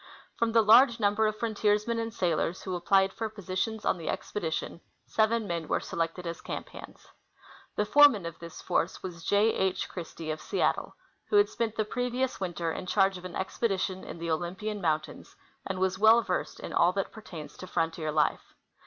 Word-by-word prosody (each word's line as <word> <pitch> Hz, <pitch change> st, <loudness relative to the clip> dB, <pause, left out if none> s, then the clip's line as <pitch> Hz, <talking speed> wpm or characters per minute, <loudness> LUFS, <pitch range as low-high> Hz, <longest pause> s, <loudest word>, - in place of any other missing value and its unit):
From 230 Hz, -1 st, +1 dB
the 225 Hz, 0 st, +5 dB
large 230 Hz, +2 st, +6 dB
number 210 Hz, +1 st, +2 dB
of 215 Hz, 0 st, -2 dB
frontiersmen 215 Hz, 0 st, +1 dB
and 225 Hz, 0 st, -3 dB
sailors 175 Hz, -2 st, -1 dB
who 185 Hz, -, -4 dB
applied 190 Hz, +2 st, +3 dB
for 225 Hz, -1 st, -3 dB
positions 210 Hz, +2 st, -3 dB
on 180 Hz, -, +1 dB
the 165 Hz, -, -4 dB
expedition, 170 Hz, -2 st, -3 dB, 0.2 s
seven 220 Hz, +1 st, +1 dB
men 170 Hz, -4 st, -3 dB
were -, -, +1 dB
selected 165 Hz, +2 st, -3 dB
as 170 Hz, 0 st, -5 dB
camp -, -, -6 dB
hands. -, -, -12 dB, 0.7 s
The 210 Hz, -, +1 dB
foreman 280 Hz, -6 st, +6 dB
of 170 Hz, -1 st, -7 dB
this 170 Hz, -1 st, -10 dB
force 170 Hz, -, -1 dB
was 170 Hz, -3 st, -7 dB
J. 205 Hz, +4 st, +3 dB
H. 190 Hz, -1 st, 0 dB
Christie, 165 Hz, -2 st, -6 dB
of 155 Hz, 0 st, -5 dB
Seattle, -, -, -1 dB, 0.3 s
who -, -, -1 dB
had 410 Hz, 0 st, +6 dB
spent 230 Hz, -2 st, -2 dB
the 215 Hz, -, 0 dB
previous 250 Hz, +3 st, -2 dB
winter 175 Hz, -3 st, -2 dB
in 185 Hz, -, -6 dB
charge 195 Hz, -1 st, +2 dB
of 180 Hz, -, -12 dB
an 180 Hz, -, -7 dB
ex 190 Hz, -, -4 dB
pedition 190 Hz, -4 st, 0 dB
in -, -, -8 dB
the 165 Hz, 0 st, -3 dB
Olympian 190 Hz, +6 st, -3 dB
mountains, 155 Hz, -3 st, -2 dB, 0.3 s
and -, -, -3 dB
was 190 Hz, 0 st, 0 dB
well 225 Hz, +2 st, +6 dB
versed 180 Hz, -3 st, -3 dB
in -, -, -7 dB
all 175 Hz, +2 st, +4 dB
that 195 Hz, 0 st, -2 dB
pertains 170 Hz, -8 st, -9 dB
to 185 Hz, -, -8 dB
frontier 165 Hz, -2 st, -1 dB
life. 150 Hz, -1 st, 0 dB
190 Hz, 190 wpm, -29 LUFS, 170-220 Hz, 0.7 s, large